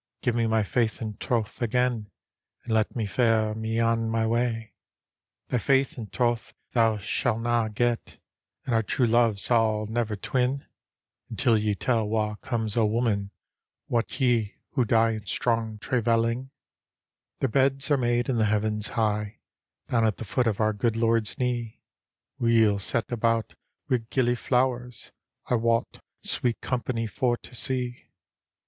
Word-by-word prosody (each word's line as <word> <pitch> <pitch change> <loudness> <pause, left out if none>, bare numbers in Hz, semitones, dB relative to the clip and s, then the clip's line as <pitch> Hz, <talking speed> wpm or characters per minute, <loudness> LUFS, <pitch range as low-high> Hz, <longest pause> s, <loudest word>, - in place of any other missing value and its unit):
Give 125 - +2
me 115 -1 +1
my 110 -1 +2
faith 115 +1 0
and 110 -2 -5
troth 115 -2 -2
again, 120 -2 0 0.5
And 115 - -3
let 110 -1 +1
me 115 -3 -1
fare 110 +1 +2
me 110 +1 -2
on 115 0 +1
my 115 0 +1
way." 115 -1 -1 0.4
" - - -64
Thy 125 - +1
faith 135 +2 +2
and 110 -5 -8
troth 120 -2 -1 0.2
thou 115 -2 +3
sail 110 +3 -1
na 120 -1 +1
get, 120 +2 -1 0.5
And 125 - -1
our 115 - +4
true 115 +2 +1
!ove 115 -4 +3
sail 110 -1 +2
never 110 0 -1
twin. 130 +6 -1 0.6
Until 115 - +2
ye 105 -1 +1
tell 115 -1 0
wha' 105 0 0
comes 110 -4 -3
o' 115 - +3
women, 105 -3 0 0.6
Wot 120 +3 -1
ye, 120 -5 +2 0.2
who 130 -4 +1
die 115 0 +3
in 110 -2 -6
strong 115 -1 -1
traivcUing? 115 +2 0 0.3
" - - -66
" - - -59
Their 135 - +1
beds 135 +3 +2
are - - +6
made 120 -1 +1
in 130 - 0
the 110 - +3
heavens 105 0 0
high, 105 -1 0 0.5
Down 115 -2 +2
at 110 -3 +1
the 115 - -6
foot 120 +4 0
of 105 -3 0
our 110 -1 +2
good 110 +2 0
Lord's 115 -2 +1
knee, 120 -3 -2 0.6
Weel 115 -3 +4
set 115 +4 0
about 115 -2 0 0.3
wi' 125 - +2
gillyflowers; 125 -1 0 0.3
I - - -2
wot, 115 0 0 0.2
sweet 120 -2 -1
company 120 -2 -2
for 120 +2 0
to - - -12
see. 125 0 -1
115 Hz, 160 wpm, -26 LUFS, 110-120 Hz, 0.6 s, are